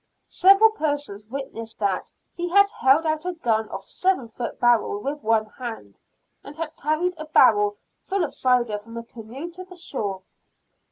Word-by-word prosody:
Several 395 +4 +6
persons 290 - -3
witnessed 230 -3 -7
that 200 -3 -1 0.2
"he 350 0 -3
had 400 +2 +5
held 275 +5 +3
out 310 0 0
a 360 0 -2
gun 225 -9 0
of 195 0 -7
seven 370 - 0
foot 235 +1 -6
barrel 240 -4 +3
with 285 +7 -4
one 220 -2 +2
hand; 220 - -8 0.4
and 290 +2 -11
had 320 -1 -5
carried 310 +5 0
a 310 - -5
barrel 415 +6 +4 0.2
full 390 -2 -1
of 310 - -3
cider 240 -5 +1
from 230 +2 -11
a 230 - -5
canoe 240 +8 -9
to 365 +2 -9
the 370 0 -14
shore." 205 - -4
270 Hz, 170 wpm, -24 LUFS, 225-345 Hz, 0.4 s, Several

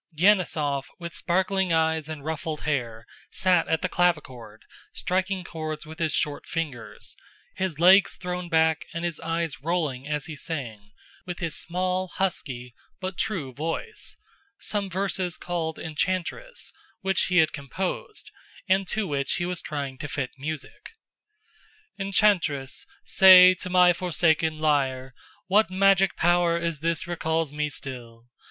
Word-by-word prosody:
Denísov, 155 -7 +2
with 170 -1 -7
sparkling 190 +1 +1
eyes 160 -1 +1
and 150 -3 -7
ruffled 155 -1 -3
hair, 120 -7 -2 0.2
sat 180 -3 +2
at 160 +1 0
the - - +2
clavichord 130 -12 -1 0.3
striking 185 +1 -1
chords 155 -2 -5
with 160 +2 -11
his 160 -2 +1
short 150 -1 -1
fingers, 150 -8 -5 0.4
his 185 -5 -2
legs 185 +3 +6
thrown 180 -1 -5
back 160 -1 +3
and 170 +1 -2
his 170 -2 -2
eyes 165 -4 -2
rolling 150 -5 -1
as 150 -1 -2
he 160 -3 -7
sang, 120 -10 -6 0.4
with 175 -1 -4
his 165 -5 -3
small, 185 +3 -1
husky, 130 -10 -2 0.3
but 185 0 -4
true 165 -10 -2
voice, 165 - -5 0.4
some 205 -2 -2
verses 185 -2 -1
called 165 -3 -3
"Enchantress," 185 - -3 0.3
which 190 0 +2
he 180 - +1
had 160 -2 +4
composed, 180 - -5 0.4
and 190 0 +2
to 215 +2 -1
which 140 -5 -1
he 175 - -1
was 180 -1 -3
trying 140 -3 -5
to - - -4
fit 135 -3 -3
music: 155 - -7 1.1
Enchantress, 190 -9 +1 0.2
say, 185 -1 +9
to 185 0 -6
my 180 -1 +6
forsaken 160 -2 +1
lyre 135 -4 0 0.3
What 205 +3 +3
magic 195 0 +4
power 175 0 +3
is 170 -3 -2
this 165 +2 -1
recalls 160 -3 -1
me 150 0 -1
still? 120 -5 -8
165 Hz, 140 wpm, -26 LUFS, 150-185 Hz, 1.1 s, say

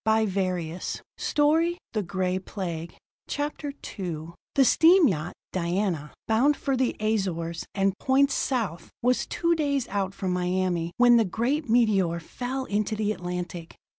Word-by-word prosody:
Parkinson's 185 -6 0 0.2
story 320 +4 +2 0.2
follows: 185 -3 -2 0.4
CHAPTER 290 0 -3 0.3
II 165 -4 -4 0.3
The 270 - +5
steam 335 +4 +6
yacht, 175 -4 -2 0.2
Diana, 175 -3 -1 0.2
bound 255 +7 +3
for 275 - 0
the 255 -1 +1
Azores 185 -6 -1
and 195 -1 +2
points 275 +1 +3
south, 205 - -1
was 250 +1 +2
two 340 0 +1
days 285 -5 0
out 195 -1 -2
from 190 -2 -2
Miami 180 -1 0
when 245 -1 +7
the 230 - +5
great 240 - -1
meteor 200 -8 +3
fell 255 +9 -4
into 215 0 -1
the 210 0 0
Atlantic. 180 -3 -5
205 Hz, 130 wpm, -26 LUFS, 180-255 Hz, 0.4 s, when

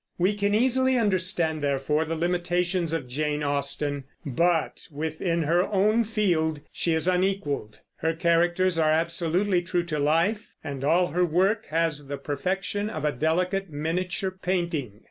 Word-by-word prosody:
We 185 +4 +2
can 205 0 0
easily 260 +2 +3
understand, 180 -7 +1
therefore, 145 +2 0
the 165 +1 -3
limitations 175 0 0
of 160 -6 -2
Jane 150 +3 -2
Austen; 140 0 -2 0.2
but 165 +4 0
within 160 +3 -2
her 170 +4 +3
own 215 +3 +2
field 175 -8 +1
she 165 -2 0
is 160 +2 0
unequaled. 180 - -1 0.2
Her 160 0 0
characters 175 +1 +2
are 155 -1 +3
absolutely 170 +4 +1
true 175 0 -1
to 155 -3 -3
life, 165 +9 +1 0.2
and 140 -3 -5
all 175 +5 +3
her 180 +4 +1
work 190 +6 +1
has 160 -3 -1
the 140 0 -4
perfection 190 +9 -2
of 155 -8 -4
a 150 - +2
delicate 180 +7 0
miniature 175 +5 -2
painting. 170 - -2
170 Hz, 145 wpm, -26 LUFS, 150-185 Hz, 0.2 s, easily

